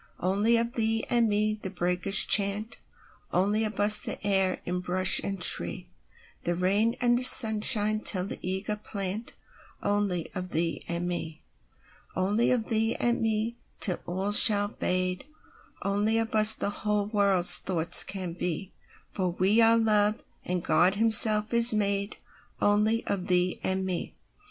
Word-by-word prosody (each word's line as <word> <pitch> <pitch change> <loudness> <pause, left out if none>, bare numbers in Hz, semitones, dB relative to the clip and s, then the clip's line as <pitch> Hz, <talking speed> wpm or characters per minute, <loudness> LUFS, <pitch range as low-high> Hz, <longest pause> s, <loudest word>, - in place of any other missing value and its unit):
Only 205 +6 -1
of 235 +1 -3
thee 225 -1 -3
and 235 -2 0
me 215 +1 -3
the 190 - -7
breakers 180 +1 +1
chant, 205 +2 0 0.5
Only 205 +4 -2
of 215 - -8
us 210 +1 +6
the - - -4
stir 195 -2 -2
in 180 +1 -5
bush 185 +1 +4
and 195 -1 -6
tree; - - +2 0.6
The 175 - -4
rain 200 +6 -2
and 245 0 0
sunshine 215 -3 +5
tell 185 -4 +1
the - - -8
eager 190 +3 -4
plantOnly 205 -2 -7
of 185 -1 -7
thee 165 0 -4
and 170 +1 -5
me. 160 -3 -8 0.7
Only 205 +5 -2
of 235 -3 -3
thee 225 0 -2
and 240 0 -3
me, 225 +1 -4 0.2
till 180 - 0
all 190 +3 -5
shall 205 -1 +5
fade; 185 0 -4 0.6
Only 205 +3 -2
of 225 0 -4
us 215 0 +6
the 200 - -5
whole 210 -1 -4
world's 200 -4 +4
thoughts 170 -3 +5
can 185 -3 -8
be—For 180 +2 -8
we 190 +6 -1
are 225 0 +3
Love, 215 -1 -1 0.2
and 180 -1 -6
God 185 +3 0
Himself 220 0 +4
is 235 0 +5
madeOnly 205 +1 -4
of 190 -2 -6
thee 180 0 -1
and 190 0 -4
me. 180 -2 -7
205 Hz, 145 wpm, -24 LUFS, 185-220 Hz, 0.7 s, us